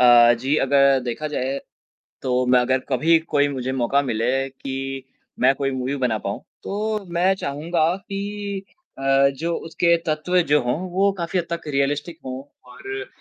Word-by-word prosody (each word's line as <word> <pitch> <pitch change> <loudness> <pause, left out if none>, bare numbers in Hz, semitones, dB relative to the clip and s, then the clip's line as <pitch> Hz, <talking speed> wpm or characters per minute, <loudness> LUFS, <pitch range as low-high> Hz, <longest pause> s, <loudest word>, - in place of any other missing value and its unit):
अ, 120 -1 +7
जी 130 +5 0
अगर 140 0 +4
देखा 125 +5 -4
जाए 135 -2 -2 0.6
तो 125 -1 +1
मैं 125 0 +5
अगर 130 +2 +2
कभी 155 +6 +4
कोई 145 -3 +1
मुझे 130 -2 -3
मौका 130 +2 +2
मिले 130 +2 0
कि 135 0 -5 0.4
मैं 135 - +5
कोई 135 0 -1
मूवी 130 +1 -2
बना 125 -5 0
पाऊँ, 100 -1 -4 0.2
तो 210 +1 -2
मैं 185 +3 +3
चाहूँगा 165 0 0
कि 200 0 -5 0.3
अ, - - -7 0.3
जो 165 +4 -2
उसके 170 +1 +3
तत्व 155 +3 0
जो 150 0 +4
हों, 120 0 0 0.2
वो 195 +2 +3
काफ़ी 170 +2 -1
हद 170 - -1
तक 170 0 -2
रियलिस्टिक 145 +4 -1
हों 130 0 -5 0.3
और 395 - -6
140 Hz, 165 wpm, -22 LUFS, 130-170 Hz, 0.6 s, अ